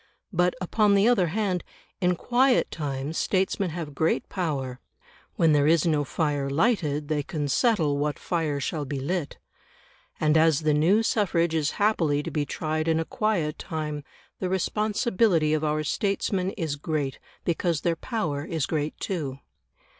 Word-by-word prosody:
But, 180 Hz, 0 st, +2 dB
upon 205 Hz, +3 st, +2 dB
the 200 Hz, +3 st, +4 dB
other 230 Hz, -8 st, +4 dB
hand, 185 Hz, 0 st, -1 dB, 0.4 s
in 180 Hz, -1 st, +2 dB
quiet 250 Hz, +7 st, +2 dB
times 145 Hz, 0 st, -3 dB
statesmen 190 Hz, 0 st, 0 dB
have 160 Hz, -3 st, -5 dB
great 160 Hz, +4 st, 0 dB
power; 140 Hz, -9 st, -3 dB, 0.6 s
when 165 Hz, -2 st, +4 dB
there 145 Hz, 0 st, +4 dB
is 165 Hz, 0 st, +4 dB
no 155 Hz, -3 st, +2 dB
fire 145 Hz, -1 st, -1 dB
lighted, 150 Hz, -, +1 dB
they 150 Hz, -1 st, 0 dB
can 145 Hz, 0 st, -3 dB
settle 155 Hz, -, +2 dB
what 150 Hz, 0 st, -1 dB
fire 160 Hz, -5 st, -1 dB
shall 150 Hz, +2 st, -2 dB
be 140 Hz, 0 st, -4 dB
lit. 160 Hz, +3 st, -3 dB, 0.8 s
And 155 Hz, 0 st, +3 dB
as 160 Hz, -1 st, +4 dB
the 155 Hz, -1 st, +2 dB
new 175 Hz, +9 st, +4 dB
suffrage 175 Hz, -7 st, +1 dB
is 155 Hz, -2 st, 0 dB
happily 165 Hz, -9 st, +2 dB
to -, -, -5 dB
be 145 Hz, -2 st, -1 dB
tried 155 Hz, +2 st, -2 dB
in 160 Hz, 0 st, +2 dB
a 165 Hz, -, -1 dB
quiet 175 Hz, -9 st, -1 dB
time, 150 Hz, -3 st, -4 dB, 0.4 s
the 185 Hz, -, -2 dB
responsibility 200 Hz, -, +1 dB
of 155 Hz, 0 st, 0 dB
our 155 Hz, 0 st, 0 dB
statesmen 195 Hz, +2 st, 0 dB
is 160 Hz, -6 st, -2 dB
great 145 Hz, -3 st, -2 dB, 0.3 s
because 170 Hz, -2 st, 0 dB
their 170 Hz, -1 st, +1 dB
power 160 Hz, -, -3 dB
is 160 Hz, -2 st, -2 dB
great 155 Hz, -1 st, -2 dB
too. 150 Hz, -8 st, -3 dB
160 Hz, 160 wpm, -26 LUFS, 150-185 Hz, 0.8 s, the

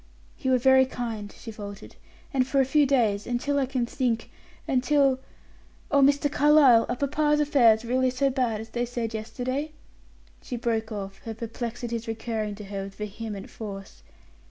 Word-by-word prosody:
"You 260 Hz, -, 0 dB
are -, -, +4 dB
very 265 Hz, +1 st, +5 dB
kind," 225 Hz, -5 st, -5 dB
she 225 Hz, -, -8 dB
faltered; 205 Hz, -2 st, -9 dB, 0.4 s
"and 255 Hz, -2 st, +2 dB
for 275 Hz, +1 st, +1 dB
a 265 Hz, -, +4 dB
few 285 Hz, +2 st, +3 dB
days; 220 Hz, -7 st, +1 dB
until 270 Hz, +4 st, 0 dB
I 270 Hz, -, 0 dB
can 255 Hz, -2 st, -1 dB
think; 235 Hz, -2 st, -2 dB, 0.4 s
until 270 Hz, 0 st, +3 dB, 0.7 s
Oh, 285 Hz, -1 st, +4 dB
Mr. 280 Hz, +1 st, +4 dB
Carlyle, 290 Hz, -5 st, +5 dB
are -, -, 0 dB
papa's 295 Hz, +3 st, +1 dB
affairs 240 Hz, -7 st, +4 dB
really 255 Hz, +2 st, +2 dB
so 270 Hz, +2 st, +1 dB
bad 245 Hz, -5 st, 0 dB
as 225 Hz, +1 st, -8 dB
they 240 Hz, -, -2 dB
said 235 Hz, -2 st, -3 dB
yesterday?" 250 Hz, +7 st, -3 dB, 0.7 s
she 245 Hz, -, -5 dB
broke 225 Hz, -1 st, -1 dB
off, 195 Hz, -2 st, -6 dB
her 225 Hz, -1 st, -7 dB
perplexities 235 Hz, 0 st, -5 dB
recurring 220 Hz, -2 st, -3 dB
to 210 Hz, -, -9 dB
her 195 Hz, -1 st, -5 dB
with 195 Hz, 0 st, -10 dB
vehement 210 Hz, -1 st, -6 dB
force. 195 Hz, -3 st, -8 dB
240 Hz, 165 wpm, -26 LUFS, 220-270 Hz, 0.7 s, very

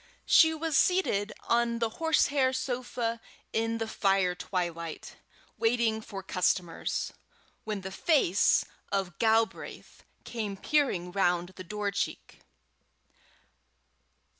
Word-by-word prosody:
She 320 Hz, -, +6 dB
was 315 Hz, -1 st, -2 dB
seated 245 Hz, -, +2 dB, 0.2 s
on 235 Hz, 0 st, +2 dB
the 230 Hz, -1 st, 0 dB
horsehair 285 Hz, -5 st, +3 dB
sofa 245 Hz, -3 st, -2 dB, 0.3 s
in 225 Hz, 0 st, 0 dB
the 225 Hz, 0 st, -3 dB
fire 195 Hz, -4 st, +2 dB
twilight, 170 Hz, -3 st, -4 dB, 0.4 s
waiting 225 Hz, -1 st, +2 dB
for 195 Hz, -2 st, -8 dB
customers, 180 Hz, -2 st, -1 dB, 0.5 s
when 210 Hz, -2 st, -3 dB
the 190 Hz, +1 st, -6 dB
face 205 Hz, -, +3 dB, 0.3 s
of 195 Hz, -3 st, -2 dB
Galbraith 225 Hz, 0 st, 0 dB, 0.2 s
came 210 Hz, -4 st, -4 dB
peering 195 Hz, -11 st, +1 dB
round 175 Hz, -2 st, +1 dB
the 185 Hz, 0 st, -10 dB
door 205 Hz, +2 st, -3 dB
cheek. 200 Hz, 0 st, -4 dB
220 Hz, 105 wpm, -29 LUFS, 190-240 Hz, 0.5 s, She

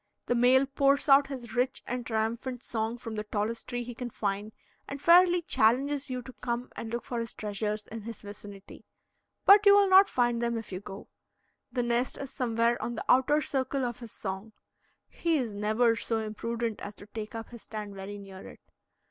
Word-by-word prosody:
The -, -, +1 dB
male 250 Hz, +3 st, +5 dB
pours 275 Hz, +1 st, +2 dB
out 275 Hz, 0 st, +6 dB
his 255 Hz, -4 st, -7 dB
rich 250 Hz, +2 st, 0 dB
and 250 Hz, 0 st, -3 dB
triumphant 235 Hz, +3 st, -2 dB
song 225 Hz, +1 st, -2 dB
from 230 Hz, -2 st, -7 dB
the 210 Hz, -1 st, -3 dB
tallest 215 Hz, +2 st, -3 dB
tree 245 Hz, -1 st, -3 dB
he 240 Hz, +1 st, -7 dB
can 245 Hz, +1 st, -5 dB
find, 205 Hz, -1 st, -3 dB, 0.4 s
and 280 Hz, -, -6 dB
fairly 350 Hz, +2 st, +6 dB
challenges 275 Hz, +4 st, +2 dB
you 250 Hz, -1 st, -4 dB
to 255 Hz, -, -10 dB
come 240 Hz, 0 st, -4 dB
and 225 Hz, -, -6 dB
look 235 Hz, 0 st, -3 dB
for 240 Hz, -, -4 dB
his 230 Hz, 0 st, -4 dB
treasures 210 Hz, 0 st, -3 dB
in 225 Hz, 0 st, -8 dB
his 225 Hz, +1 st, -8 dB
vicinity. 205 Hz, -1 st, -11 dB, 0.6 s
But 405 Hz, +1 st, +8 dB
you 400 Hz, -, +9 dB
will 405 Hz, -1 st, +5 dB
not 385 Hz, +1 st, +8 dB
find 240 Hz, -1 st, +1 dB
them 235 Hz, -1 st, 0 dB
if 225 Hz, -2 st, -7 dB
you 185 Hz, -, -4 dB
go. 195 Hz, 0 st, -10 dB, 0.6 s
The 245 Hz, -1 st, 0 dB
nest 240 Hz, +1 st, 0 dB
is 275 Hz, -1 st, -7 dB
somewhere 235 Hz, -1 st, +1 dB
on 240 Hz, -, -3 dB
the -, -, -5 dB
outer 265 Hz, +4 st, +4 dB
circle 265 Hz, -1 st, -1 dB
of 240 Hz, -2 st, -4 dB
his 235 Hz, -3 st, -9 dB
song; 195 Hz, +2 st, -6 dB, 0.5 s
he 335 Hz, -2 st, 0 dB
is 240 Hz, -6 st, -2 dB
never 220 Hz, +3 st, +2 dB
so 230 Hz, 0 st, -2 dB
imprudent 225 Hz, +1 st, -3 dB
as 205 Hz, +1 st, -7 dB
to -, -, -12 dB
take 215 Hz, +1 st, -7 dB
up 225 Hz, 0 st, -6 dB
his 235 Hz, -2 st, -11 dB
stand 210 Hz, -2 st, -7 dB
very 195 Hz, +1 st, -7 dB
near 195 Hz, -1 st, -10 dB
it. -, -, -14 dB
235 Hz, 200 wpm, -29 LUFS, 215-260 Hz, 0.6 s, you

